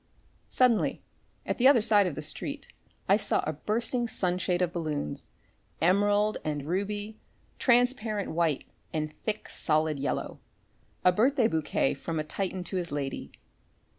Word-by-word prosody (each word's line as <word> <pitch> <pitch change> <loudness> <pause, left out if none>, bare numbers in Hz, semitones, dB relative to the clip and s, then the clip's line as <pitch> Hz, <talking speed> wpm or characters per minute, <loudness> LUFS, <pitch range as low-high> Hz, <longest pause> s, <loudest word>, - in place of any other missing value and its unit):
Suddenly, 250 -4 +3 0.4
at - - -2
the 250 - +7
other 260 -6 +6
side 205 -3 +4
of 165 - -3
the 155 - -5
street - - -5 0.4
I - - +5
saw - - 0
a 155 - -1
bursting 230 - -1
sunshade 180 -3 0
of 175 -1 -1
balloons, 155 - -3 0.5
emerald 205 +5 +3
and 145 -2 -3
ruby, 205 +5 -3 0.4
transparent 240 -4 +2
white 160 -4 +1 0.3
and 155 -1 -2
thick, 215 -1 -2
solid 155 -2 0
yellow, 140 - -3 0.7
a 180 - +8
birthday 240 +5 +3
bouquet 160 -6 0
from 165 -1 -4
a - - 0
Titan 185 +3 -3
to 185 - -4
his 175 -1 -3
lady. 140 -2 -4
185 Hz, 140 wpm, -28 LUFS, 155-215 Hz, 0.7 s, a